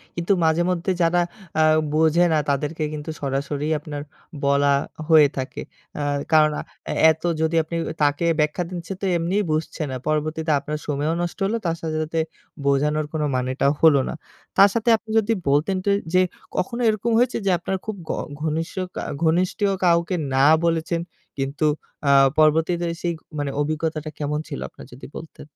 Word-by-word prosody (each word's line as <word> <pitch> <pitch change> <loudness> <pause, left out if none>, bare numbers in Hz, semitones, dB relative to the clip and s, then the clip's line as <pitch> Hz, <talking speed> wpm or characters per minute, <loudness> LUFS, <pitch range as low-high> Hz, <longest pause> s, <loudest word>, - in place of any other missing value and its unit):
কিন্তু 175 +3 +1
মাঝেমধ্যে 175 +3 +1
যারা 175 +1 +3 0.4
আ - - +6 0.3
বোঝে 160 +2 +4
না 155 - +3
তাদেরকে 150 +3 -1
কিন্তু 150 +1 -6
সরাসরি 140 +2 -2
আপনার 145 -1 -6 0.4
বলা 140 0 +3 0.4
হয়ে 155 -2 +7
থাকে। 130 0 -4 0.4
আ - - -1 0.3
কারণ 155 -1 +5 0.4
এ - - -1 0.2
এত 160 - -6 0.2
যদি 160 +1 +1
আপনি 160 +2 -6 0.3
তাকে 145 +3 +2
ব্যাখ্যা 150 +4 +1
দিচ্ছেন 180 +1 -6
তো - - -1
এমনিই 185 +5 0
বুঝছে 155 +1 -2
না। 130 - -4
পরবর্তীতে 155 +1 0
আপনার 150 +2 -4
সময়ও 150 +2 0
নষ্ট 175 - -3
হলো; 225 +4 0
তার 165 0 0
সাথে, 155 -1 -3
সাথে 160 +1 -2 0.5
বোঝানোর 150 +2 +2
কোন 155 - -1
মানেটাও 130 +2 +1
হল 160 -3 +7
না। - - -3 0.4
তার 200 +1 +8
সাথে 230 0 0
আপনি 220 0 -22
যদি 225 +1 0 0.2
বলতেন 155 +7 +2
ট - - -6 0.3
যে 185 - +5 0.4
কখনো 235 +6 -1
এরকম 215 +2 0
হয়েছে 250 +2 +2
যে 195 - +3
আপনার 190 +2 -2
খুব 215 -2 -3
ক - - +1 0.3
ঘনিষ্ঠ 160 +1 -2 0.2
কা - - -3 0.2
ঘনিষ্ঠীয় 185 +5 +2
কাউকে 170 +1 +3 0.2
না 135 +1 +4 0.2
বলেছেন। 165 0 0 0.4
কিন্তু 140 +3 -1 0.4
আ - - +6 0.3
পরবর্তীতে 160 +3 +3 0.2
সেই 175 -1 -1 0.3
মানে 140 -1 -2
অভিজ্ঞতাটা 155 0 -2
কেমন 150 0 -1
ছিল 140 - -5
আপনার - - -13
যদি 125 - -11
বলতেন? 160 - -9
160 Hz, 165 wpm, -23 LUFS, 150-175 Hz, 0.5 s, তার